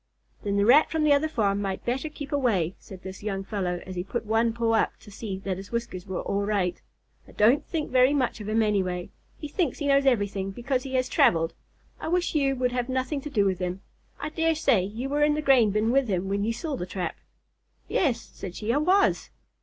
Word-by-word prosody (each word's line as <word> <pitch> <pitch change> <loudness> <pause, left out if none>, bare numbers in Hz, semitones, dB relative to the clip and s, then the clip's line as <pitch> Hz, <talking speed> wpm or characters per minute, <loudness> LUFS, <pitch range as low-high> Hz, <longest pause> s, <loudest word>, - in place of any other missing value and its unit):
"Then 200 0 -1
the 200 - +3
Rat 275 +7 +6
from 320 -1 0
the 300 -1 +5
other 285 +2 +2
farm 205 -9 0
might 195 -2 -3
better 260 +6 -1
keep 290 -2 -8
away," 215 - +1
said 190 -1 -12
this 190 0 -8
young 195 -2 -3
fellow, 185 -4 -3
as 185 - -7
he 180 - -2
put 230 +5 -4
one 225 +2 +2
paw 230 0 0
up 225 - +1
to 205 - -14
see 200 -2 -5
that 190 -2 -1
his 195 +1 -10
whiskers 230 -6 -4
were 190 - -3
all 200 - -1
right. 195 -4 -1 0.5
"I - - -15
don't 245 +8 +4
think 315 -3 -3
very 255 +1 +5
much 255 -6 0
of 210 - -5
him 220 +1 +2
anyway. 185 -4 -1 0.3
He 300 - -6
thinks 300 -2 -1
he 290 - -4
knows 275 -1 +3
everything 205 -5 +1
because 250 +6 -2
he 265 0 -5
has 255 0 +2
travelled. 170 - +3 0.5
I - - -5
wish 350 +1 0
you 275 -3 +2
would 250 -1 0
have 245 0 -2
nothing 260 +2 -1
to 295 - -6
do 210 -8 +2
with 190 -2 0
him. 180 +1 -3 0.4
I 290 +2 -3
dare 325 +1 +1
say 265 -10 +3
you 220 +7 -4
were 290 +2 +1
in 295 0 +3
the - - -1
grain 260 -6 +5
bin 215 +3 +1
with 270 0 +3
him 190 -1 -1
when 200 +1 0
you 225 - 0
saw 280 +5 -4
the 180 - -5
trap." 180 -2 -3 0.7
"Yes," 260 -9 +1
said 180 -2 -7
she, 225 +2 -1
"I - - +2
was." 370 +7 +2
230 Hz, 235 wpm, -26 LUFS, 195-275 Hz, 0.7 s, Rat